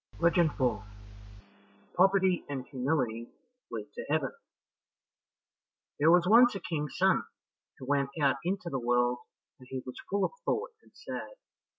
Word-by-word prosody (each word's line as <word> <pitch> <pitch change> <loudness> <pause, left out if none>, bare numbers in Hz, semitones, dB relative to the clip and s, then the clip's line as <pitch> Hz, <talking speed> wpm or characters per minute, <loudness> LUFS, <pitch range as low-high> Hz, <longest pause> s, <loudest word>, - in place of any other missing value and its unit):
Legend 170 -1 +4
4 120 -7 0 1.1
Poverty 190 -1 +3
and 135 -3 -4
Humility 125 -4 -1 0.4
Lead 110 -3 -5
to - - -6
Heaven 145 -3 +1 1.7
There 150 +3 +5
was 175 +1 +5
once 235 +2 +6
a - - -3
King's 150 -5 -4
son - - +3 0.6
who 130 - -9
went 140 0 +1
out 140 -2 +3
into 180 -1 -2
the 135 - -1
world, 120 0 +1 0.4
and 130 - -15
he 130 -1 -5
was 125 - -8
full 200 0 +1
of - - -2
thought 460 +2 -1
and - - -24
sad. - - -7
145 Hz, 145 wpm, -30 LUFS, 125-180 Hz, 1.7 s, once